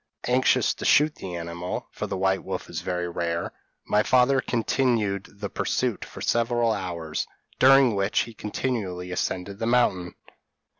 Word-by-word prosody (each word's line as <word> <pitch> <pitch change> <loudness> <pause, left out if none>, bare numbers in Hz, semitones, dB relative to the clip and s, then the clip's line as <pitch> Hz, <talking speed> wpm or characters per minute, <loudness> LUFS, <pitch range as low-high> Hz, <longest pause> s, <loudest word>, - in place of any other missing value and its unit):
p> 125 - -1
"Anxious 130 +1 +3
to - - -9
shoot 150 +2 +4
the 90 -9 -7
animal 85 +1 -5
(for - - -5
the 95 - -3
white 95 0 +1
wolf - - -5
is - - -4
very 90 -1 -2
rare) 85 -1 -2 0.3
my 105 - +3
father 130 +4 +4
continued 115 -5 0
the 100 0 -6
pursuit - - -1
for - - -11
several 120 0 +1
hours, 85 -6 -3 0.3
during 135 -2 +6
which 100 +1 +1
he 115 - -6
continually 105 -5 -3
ascended 95 +2 -3
the 115 - -1
mountain. 95 -8 +1
100 Hz, 155 wpm, -25 LUFS, 90-120 Hz, 0.3 s, during